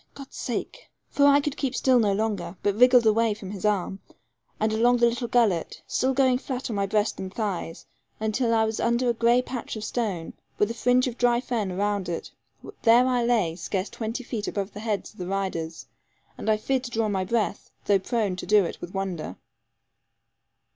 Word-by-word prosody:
God's 275 Hz, -1 st, -11 dB
sake -, -, -5 dB
' -, -, -50 dB
For 285 Hz, 0 st, +4 dB
I 285 Hz, 0 st, +6 dB
could 290 Hz, 0 st, -2 dB
keep 270 Hz, -2 st, -2 dB
still 255 Hz, -2 st, +4 dB
no 210 Hz, -3 st, +3 dB
longer, 205 Hz, -3 st, -2 dB
but 205 Hz, -, +2 dB
wriggled 250 Hz, +2 st, +6 dB
away 220 Hz, 0 st, +3 dB
from 195 Hz, -2 st, -8 dB
his 200 Hz, -1 st, -6 dB
arm, 195 Hz, -2 st, 0 dB, 0.6 s
and 215 Hz, 0 st, +1 dB
along 240 Hz, +3 st, +4 dB
the 240 Hz, -, +4 dB
little 240 Hz, +1 st, 0 dB
gullet, 225 Hz, -8 st, +1 dB
still 260 Hz, -, 0 dB
going 260 Hz, -2 st, +3 dB
flat 260 Hz, -2 st, -4 dB
on -, -, -3 dB
my 200 Hz, -1 st, 0 dB
breast 210 Hz, +1 st, 0 dB
and 190 Hz, -1 st, -5 dB
thighs, 190 Hz, -6 st, -4 dB, 0.3 s
until 220 Hz, +3 st, 0 dB
I 225 Hz, -1 st, +3 dB
was 220 Hz, 0 st, -2 dB
under 235 Hz, +1 st, +1 dB
a -, -, +3 dB
grey 235 Hz, +2 st, +3 dB
patch 250 Hz, -2 st, -5 dB
of 215 Hz, -, -6 dB
stone, 210 Hz, -7 st, -3 dB, 0.2 s
with 210 Hz, +2 st, +2 dB
a -, -, -3 dB
fringe 245 Hz, +2 st, +2 dB
of 250 Hz, -2 st, -5 dB
dry 240 Hz, -1 st, +3 dB
fern 215 Hz, -7 st, -2 dB
round 200 Hz, -2 st, -1 dB
it; 170 Hz, -, -4 dB, 0.5 s
there 235 Hz, +2 st, +6 dB
I 250 Hz, -2 st, +1 dB
lay, 220 Hz, -9 st, +1 dB
scarce 190 Hz, +2 st, -3 dB
twenty 230 Hz, +3 st, -4 dB
feet 220 Hz, -3 st, -4 dB
above 200 Hz, 0 st, -3 dB
the 205 Hz, -, -8 dB
heads 215 Hz, -2 st, -3 dB
of 215 Hz, -, -21 dB
the 180 Hz, -, -4 dB
riders, 185 Hz, -4 st, -3 dB, 0.5 s
and 220 Hz, -, -4 dB
I 215 Hz, -, +4 dB
feared 260 Hz, +4 st, -1 dB
to -, -, -5 dB
draw 225 Hz, -2 st, 0 dB
my 195 Hz, -2 st, 0 dB
breath, 215 Hz, +1 st, -1 dB, 0.2 s
though 200 Hz, -1 st, +4 dB
prone 210 Hz, -2 st, -1 dB
to -, -, -6 dB
do 210 Hz, -1 st, +5 dB
it -, -, -6 dB
with 175 Hz, +2 st, -8 dB
wonder. 180 Hz, -, -3 dB
220 Hz, 210 wpm, -26 LUFS, 195-245 Hz, 0.6 s, I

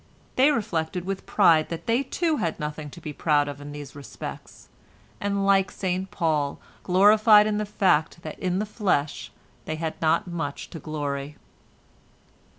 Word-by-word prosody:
They 265 Hz, +3 st, +5 dB
reflected 180 Hz, -, -1 dB
with 195 Hz, 0 st, -4 dB
pride 155 Hz, -2 st, +4 dB
that 165 Hz, -, -6 dB
they 235 Hz, +2 st, +2 dB
too 315 Hz, +3 st, -1 dB
had 165 Hz, -, -2 dB
nothing 150 Hz, 0 st, -5 dB
to 160 Hz, -, -11 dB
be 155 Hz, -2 st, -7 dB
proud 145 Hz, -1 st, +2 dB
of 145 Hz, 0 st, -7 dB
in 145 Hz, 0 st, -8 dB
these 145 Hz, -2 st, -9 dB
respects, 140 Hz, -1 st, -9 dB, 0.5 s
and 200 Hz, -1 st, -1 dB
like 195 Hz, -1 st, +4 dB
St 185 Hz, 0 st, -3 dB
Paul, 155 Hz, -5 st, -1 dB, 0.2 s
gloried 210 Hz, +3 st, +6 dB
in 210 Hz, -1 st, 0 dB
the 210 Hz, -, -2 dB
fact 175 Hz, -5 st, +1 dB
that 155 Hz, -, -7 dB
in 185 Hz, -1 st, -1 dB
the 210 Hz, -, 0 dB
flesh 190 Hz, -9 st, -1 dB, 0.3 s
they 155 Hz, -, -3 dB
had 160 Hz, 0 st, -4 dB
not 160 Hz, +1 st, +2 dB
much 165 Hz, -5 st, -5 dB
to 165 Hz, -, -7 dB
glory. 145 Hz, -1 st, -4 dB
170 Hz, 160 wpm, -25 LUFS, 150-200 Hz, 0.5 s, gloried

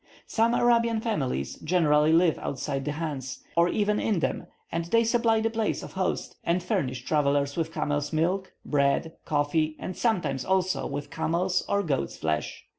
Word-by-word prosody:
Some 230 Hz, +1 st, +2 dB
Arabian 235 Hz, -1 st, +3 dB
families 135 Hz, -, -2 dB
generally 155 Hz, -3 st, +3 dB
live 165 Hz, 0 st, +4 dB
outside 135 Hz, 0 st, -3 dB
the 150 Hz, -, -1 dB
chans, 145 Hz, -5 st, -5 dB
or 170 Hz, +1 st, +4 dB
even 210 Hz, +1 st, +1 dB
in 215 Hz, -4 st, +1 dB
them, 165 Hz, -, -2 dB, 0.2 s
and 165 Hz, 0 st, -1 dB
they 230 Hz, +7 st, +3 dB
supply 230 Hz, -1 st, +2 dB
the 225 Hz, 0 st, 0 dB
place 225 Hz, -2 st, -1 dB
of -, -, -8 dB
host, 185 Hz, -1 st, -2 dB
and 175 Hz, +1 st, 0 dB
furnish 130 Hz, -7 st, -2 dB
travellers 140 Hz, -1 st, +1 dB
with 165 Hz, -1 st, -1 dB
camel's 145 Hz, -2 st, -1 dB
milk, 180 Hz, +4 st, 0 dB
bread, 145 Hz, +3 st, +1 dB
coffee, 155 Hz, +1 st, +1 dB
and 185 Hz, -, -6 dB
sometimes, 160 Hz, -, 0 dB
also, 185 Hz, -1 st, +1 dB
with 145 Hz, +1 st, -5 dB
camel's 170 Hz, +3 st, 0 dB
or 200 Hz, 0 st, +2 dB
goat's 140 Hz, -, -2 dB
flesh. 80 Hz, -1 st, -2 dB
165 Hz, 165 wpm, -27 LUFS, 145-195 Hz, 0.2 s, live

